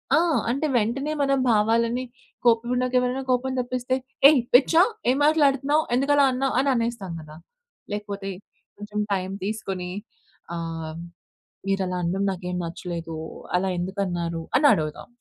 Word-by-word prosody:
ఆ! - - +5 0.3
అంటే 275 +6 0
వెంటనే 245 +7 -1
మనం 275 -1 +2
భావాలని, 230 +3 +2 0.4
కోపం 235 0 +4
ఉన్నాక 255 0 0
ఎవరైనా 250 +2 -1
కోపం 255 +1 +1
తప్పిస్తే, 250 +1 -1 0.3
ఏయ్ 295 -4 +5
పిచ్చా! 320 +7 +6 0.3
ఏం 260 - +3
మాట్లాడుతున్నావ్. 295 -1 +3
ఎందుకు 275 +3 +1
అలా 285 - +5
అన్నావ్? 265 +1 -1
అని 275 +1 +2
అనేస్తాం 230 -5 -2
కదా! 155 0 -12 0.6
లేకపోతే 200 -1 -5 0.5
కొంచెం 210 0 -5
టైమ్ 190 0 -2
తీసుకొని 195 -4 -4 0.7
ఆహ్, 165 -1 -5 0.7
మీరు 195 0 +1
అలా 180 - -2
అనడం 190 +4 -1
నాకేమి 180 -1 -4
నచ్చలేదు, 165 -1 -6 0.4
అలా 190 +1 +1
ఎందుకన్నారు, 175 -3 -2 0.2
అని 290 +1 +5
అడుగుదాం. 155 -1 -3
220 Hz, 135 wpm, -24 LUFS, 180-260 Hz, 0.7 s, పిచ్చా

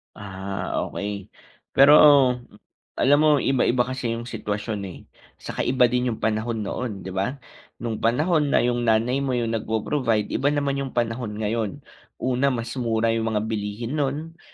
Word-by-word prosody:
Ah, 95 -1 -5 0.2
okey 100 -1 -5 0.5
pero 140 +2 +7 1.0
alam 145 +2 +4
mo 155 -1 +5
yung 135 -2 +1
iba-iba 120 0 +3
kasi 125 -2 -3
yung 115 - -5
sitwasyon, 105 -2 -4
eh, 90 - -10 0.4
saka - - -8
iba 125 -1 +3
din 125 0 +1
yung - - -16
panahon 110 0 -1
noon, 105 0 -4
di 95 - -6
ba? 95 +8 -2 0.5
Nung 115 -2 -3
panahon 150 +7 +2
na - - +3
yung 120 -1 0
nanay 115 +4 +2
mo 135 -2 -1
yung 115 -2 -1
nagpo-provide 110 0 -1
iba 135 - 0
naman 140 -1 0
yung 135 -2 -5
panahon 115 -2 -2
ngayon. 110 -1 -3 0.3
Una, 130 +2 0
mas 120 -3 -2
mura 115 -1 +1
yung 115 0 -1
mga 105 - +1
bilihin 110 +6 -3
nun, 150 +4 -3
120 Hz, 160 wpm, -24 LUFS, 110-130 Hz, 1.0 s, pero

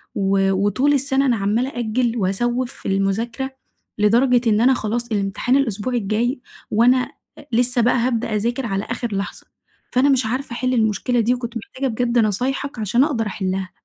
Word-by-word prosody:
و 195 0 +2
وطول 205 +9 +2
السنة 275 0 +1
أنا 245 -3 +3
عمالة 215 +6 0
أأجل 240 -1 -1
وأسوِّف 240 +6 -1
في - - -9
المُذاكرة، 225 +7 -1 0.5
لدرجة 240 +3 +3
إن 215 +1 +3
أنا 260 +2 +5
خلاص 235 0 -3
الامتحان 205 +5 0
الأسبوع 245 -2 -1
الجاي، 235 +4 -1 0.3
وأنا 240 +4 +5 0.4
أ 295 - -13
لسه 245 +1 +2
بقى 240 +2 +3
هابدأ 230 -2 0
أذاكر 235 +4 -1
على 195 -2 -2
آخر 235 -3 -4
لحظة، 195 +1 -5 0.4
فأنا 260 +3 +3
مش 260 -4 +2
عارفة 255 +2 -3
أحِلّ 255 +1 -1
المشكلة 230 +1 +1
دي! 235 +2 +2
وكنت 240 -1 -4
محتاجة 260 +4 -4
بجد 240 0 0
نصايحك 245 +5 -1
عشان 220 +5 +2
أقدر 245 -7 0
أحِلّها. 190 -2 -3
235 Hz, 165 wpm, -21 LUFS, 210-255 Hz, 0.5 s, أنا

